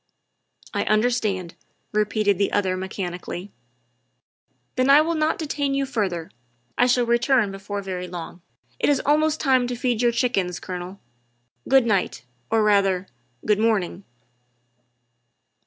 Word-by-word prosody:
' - - -53
' - - -52
" - - -22
I - - 0
understand," 215 -6 0 0.4
repeated 210 -2 +1
the 200 - +1
other 190 -2 +1
mechanically. 185 0 -5 0.6
" 125 -2 -49
Then 255 +1 +2
I 280 +2 +8
will 330 +2 0
not 310 0 +1
detain 285 -3 -2
you 275 0 0
further; 195 -11 -2 0.4
I 245 - +3
shall 245 -1 +3
return 235 -2 +2
before 200 +1 -5
very 180 -1 -4
long. 175 0 -8 0.4
It - - +2
is 285 -2 +3
almost 310 +1 +2
time 260 -3 +3
to 245 - -3
feed 240 -1 -1
your 240 -1 +4
chickens, 195 -8 0
Colonel. 180 +1 -7 0.7
Good 265 -2 +5
night, 200 - 0 0.3
or, 225 -1 +2
rather, 195 -3 +2 0.4
good 210 -1 +2
morning." 205 -4 0
215 Hz, 145 wpm, -23 LUFS, 185-250 Hz, 0.7 s, I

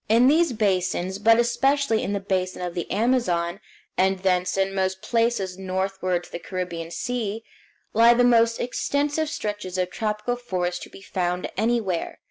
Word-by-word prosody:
In 235 +3 +5
these 320 +2 +4
basins, 190 -3 0
but 225 +2 +5
especially 240 0 +2
in 195 - -2
the 200 - 0
basin 185 -2 -2
of 175 -1 -3
the 175 - -4
Amazon, 200 -6 +1 0.4
and 190 +1 +2
thence 185 0 +1
in 195 0 +1
most 190 -1 -1
places 230 -6 0
northward 190 -1 -1
to - - -15
the - - -5
Caribbean 175 -3 -5
Sea, 225 +2 -3 0.5
lie 230 +2 +6
the 245 - +4
most 230 -1 +4
extensive 290 +5 -1
stretches 205 - -4
of 180 0 -1
tropical 215 +4 -2
forest 180 -7 -2
to - - -9
be 195 - -13
found 180 -2 -2
anywhere. 215 -5 -1
195 Hz, 160 wpm, -24 LUFS, 185-235 Hz, 0.5 s, lie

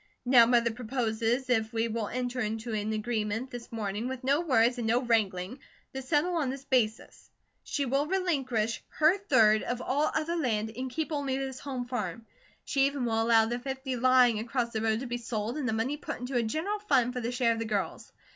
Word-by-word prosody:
Now 245 -2 +7
Mother 235 -1 +3
proposes 235 +1 -1
if 220 -3 +1
we 230 0 0
will 225 -2 -2
enter 250 +1 -3
into 220 0 -3
an 215 0 -1
agreement 220 +2 -2
this 245 -1 -8
morning 215 0 -3
with 260 0 -5
no 280 +4 +2
words 245 -6 +3
and 230 - -2
no 240 +3 +2
wrangling, 215 -1 0 0.3
to 265 - -4
settle 310 +6 +1
on 290 -5 0
this 270 +1 -5
basis: 230 -5 -1 0.3
she 285 - -2
will 275 +3 0
relinquish 270 - -1
her 320 +6 +3
third 215 - +4
of 245 0 -3
all 280 +4 0
other 320 +2 0
land, 220 -9 -1
and 260 +2 -4
keep 315 +5 -3
only 280 -3 -1
this 265 -1 -4
home 260 -3 -4
farm. 230 -4 -4 0.4
She 275 0 +2
even 280 -3 -2
will 225 -1 +1
allow 225 -1 +5
the 240 +2 -2
fifty 265 0 -4
lying 250 -2 +4
across 235 +1 -2
the 220 - -1
road 220 +1 +1
to - - -4
be 240 -1 -3
sold 230 0 -3
and 285 -5 -2
the - - +1
money 230 +7 -1
put 310 +1 -5
into 250 +2 -5
a 240 - +3
general 320 - -2
fund 260 - +2
for 250 - -3
the 235 +1 -2
share 245 -2 +2
of 225 - -5
the 225 - -2
girls. 205 -3 -3
245 Hz, 210 wpm, -29 LUFS, 225-270 Hz, 0.4 s, Now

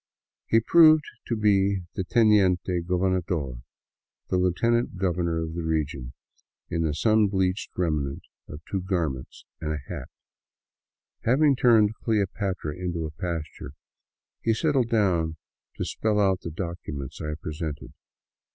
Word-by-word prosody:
He 115 - +4
proved 155 +5 +6 0.2
to 115 - 0
be 100 -2 +2
the 95 - -2
teniente 95 -5 +3
gobernador, 90 -8 -1 0.7
the 90 - +1
lieutenant 110 +5 +1
governor 85 -3 0
of 80 0 -5
the 85 - -3
region, 75 -6 -2 0.6
in 85 - 0
the 80 -2 0
sun 110 +5 +3
bleached 95 0 -1
remnants 75 -6 -1 0.2
of 75 - -9
two 95 - -2
garments 85 -9 -3
and 75 -1 -3
a - - -2
hat. - - -6 1.1
Having 140 +4 +4
turned 110 -4 +5
" - - -43
Cleopatra 100 -7 -1
" - - -13
into 85 -2 -2
a 75 - -5
pasture, 80 -3 -5 0.7
he 115 -1 +2
settled 135 -2 +1
down 85 -8 +1 0.4
to - - -3
spell 105 -1 0
out 95 -2 +2
the - - -5
documents 80 -5 -6
I 75 0 -3
presented. 75 -2 -5
90 Hz, 135 wpm, -26 LUFS, 80-105 Hz, 1.1 s, proved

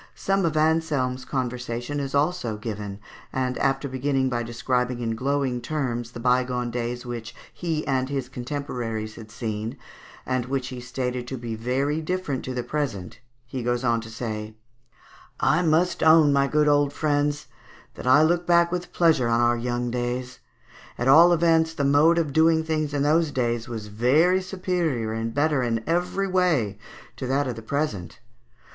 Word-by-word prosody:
Some 195 -1 0
of 155 -2 0
Anselme's 155 -5 +1
conversation 125 +1 -3
is 140 -1 -3
also 140 -7 0
given, 105 -2 -6 0.3
and 130 -1 -1
after 135 +1 +1
beginning 130 0 0
by 120 -2 -1
describing 125 +1 -1
in 115 -2 -1
glowing 130 0 -1
terms 125 -6 -3
the - - -7
bygone 125 0 +1
days 120 +1 -3
which 120 -1 -6 0.2
he 160 -3 -2
and 130 -1 0
his 135 -3 -2
contemporaries 120 -4 -4
had 110 -1 -11
seen, 110 +3 -4 0.5
and 130 -1 -1
which 130 -1 -2
he 125 -1 -7
stated 125 0 -3
to 130 - -4
be 115 -1 -5
very 135 +7 -1
different 160 -5 -2
to 130 - -4
the 125 - -2
present, 120 -12 -4 0.3
he 130 +1 -5
goes 120 +1 -1
on 115 -2 +2
to 115 - -10
say, 110 -2 -5 0.8
"I 155 +4 +3
must 170 +2 +2
own, 155 -2 +6
my 140 0 +3
good 150 +1 +2
old 145 -1 +3
friends, 145 0 0 0.5
that - - -7
I 145 +4 +6
look 175 +2 +1
back 170 0 +4
with 180 0 -4
pleasure 160 -8 +3
on 115 0 +2
our 120 0 +3
young 120 0 -2
days; 125 +1 -3 0.6
at 125 - -1
all 165 +6 +8
events 165 -1 +3
the 145 - -1
mode 145 +4 +4
of 155 -5 0
doing 160 +1 +4
things 155 -2 -1
in 140 - +1
those 160 +2 +3
days 120 -3 -1
was 110 -3 -5
very 140 - +3
superior 180 - -2
and 115 +1 -2
better 145 +1 +1
in 115 -2 -1
every 180 +4 0
way 160 - +1 0.4
to 130 - -4
that 140 +2 +1
of 125 - -3
the 115 - -8
present.... 110 - -3
130 Hz, 170 wpm, -25 LUFS, 120-155 Hz, 0.8 s, all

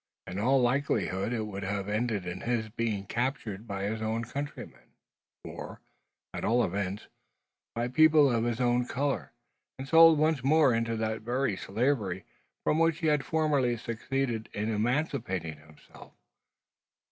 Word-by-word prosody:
In 90 +2 -5
all 130 +5 +3
likelihood 120 -6 0
it 115 -3 -1
would 100 -2 -6
have 100 0 -3
ended 105 -2 -1
in 90 +1 -5
his 120 -2 -1
being 110 -3 -2
captured 115 -3 -3
by 100 -1 -4
his 110 +2 -2
own 110 +1 -1
countrymen, 140 +4 -7 0.5
or, - - -8 0.5
at - - -5
all 120 +2 +3
events, 100 +2 -3 0.7
by 120 +1 -1
people 150 +1 +5
of 115 -1 +1
his 120 0 -1
own 125 0 +2
colour, 140 +2 -2 0.5
and 135 +1 -7
sold 165 +1 +7
once 155 -3 +1
more 145 -2 +4
into 115 0 0
that 110 0 -2
very 120 -1 0
slavery 100 -5 -1 0.4
from 155 - +2
which 165 -1 +3
he 165 - -1
had 145 -2 0
formerly 145 -6 +1
succeeded 115 0 -3
in 105 +2 -2
emancipating 110 - -1
himself. 75 0 -17
115 Hz, 145 wpm, -29 LUFS, 105-135 Hz, 0.7 s, sold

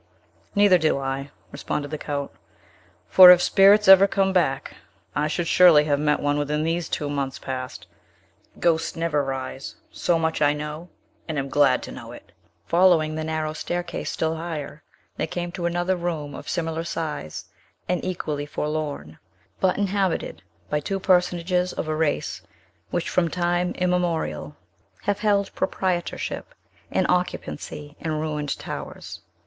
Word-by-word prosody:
"Neither 200 -3 +5
do 155 -3 +2
I," 135 +1 -3 0.2
responded 145 0 -4
the 155 - -3
Count; 140 -1 -4 0.8
"for, 185 -1 +10
if 180 -1 +9
spirits 200 +3 +5
ever 195 +1 +9
come 195 -1 +1
back, 135 -7 0 0.4
I 150 +1 +1
should 165 +3 -2
surely 165 -3 +6
have 145 -2 +1
met 150 0 +2
one 145 0 0
within 150 +1 -1
these 165 +1 -1
two 150 - -2
months 140 -2 -3
past. 130 -1 -6 0.7
Ghosts 165 -2 +1
never 165 -3 0
rise! 135 0 -5 0.2
So 175 - +1
much 160 -1 -1
I 145 0 +4
know, 150 +3 -6 0.4
and 160 -2 -3
am 140 0 -2
glad 135 -2 +3
to - - -7
know - - -9
it!" - - -14 0.3
Following 170 - +4
the 155 0 -3
narrow 155 -1 -2
staircase 175 +1 -4
still 160 0 -1
higher, 160 -3 -6 0.4
they - - -1
came 175 -1 -4
to 175 -1 -2
another 175 +2 0
room 165 -5 -4
of - - -8
similar 165 -2 -2
size 160 - -5 0.4
and 180 - -1
equally 150 -5 -3
forlorn, 150 - -4 0.4
but 185 -1 +2
inhabited 195 - -1 0.3
by 150 - 0
two 195 +6 -3
personages 180 -1 +1
of - - -4
a 155 - -1
race 155 -1 -1 0.5
which 175 - -2
from 170 -2 +1
time 175 +1 0
immemorial 175 - -1 0.5
have 205 0 0
held 200 -2 +1
proprietorship 185 -2 -2 0.3
and - - +1
occupancy 150 -4 -3
in 160 -1 -3
ruined 150 -2 -2
towers. - - -7
160 Hz, 150 wpm, -24 LUFS, 150-180 Hz, 0.8 s, for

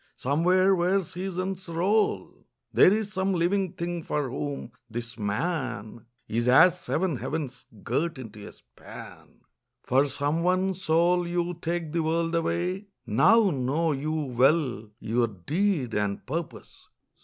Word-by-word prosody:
somewhere 180 +8 +3
where 185 +2 +2
seasons 185 +1 -4
roll 190 +6 0 0.3
There - - +7
is 210 0 -1
some 190 -1 0
living 180 +1 +1
thing 170 0 -3
for 145 -4 -2
whom 140 -3 -4 0.2
this 115 +1 -5
man 115 - -3 0.2
Is 120 +2 -1
as 180 +8 +6
seven 170 -5 -1
heavens 135 -3 -5 0.2
girt 160 +6 -1
into 110 -5 -9
a - - -10
span, - - -14 0.4
For 135 +3 +3
some 145 +4 -1
one 185 +2 +2
soul 175 0 +2
you 175 0 -1
take 170 -2 -2
the 170 +1 0
world 165 +1 0
away 175 +4 -1 0.2
Now 185 - +4
know 145 +4 0
you 145 +2 -2
well 135 -4 +1
your 115 +2 +1
deed 140 - -1
and 100 -1 -1
purpose. 165 +4 -6
165 Hz, 130 wpm, -27 LUFS, 130-180 Hz, 0.4 s, There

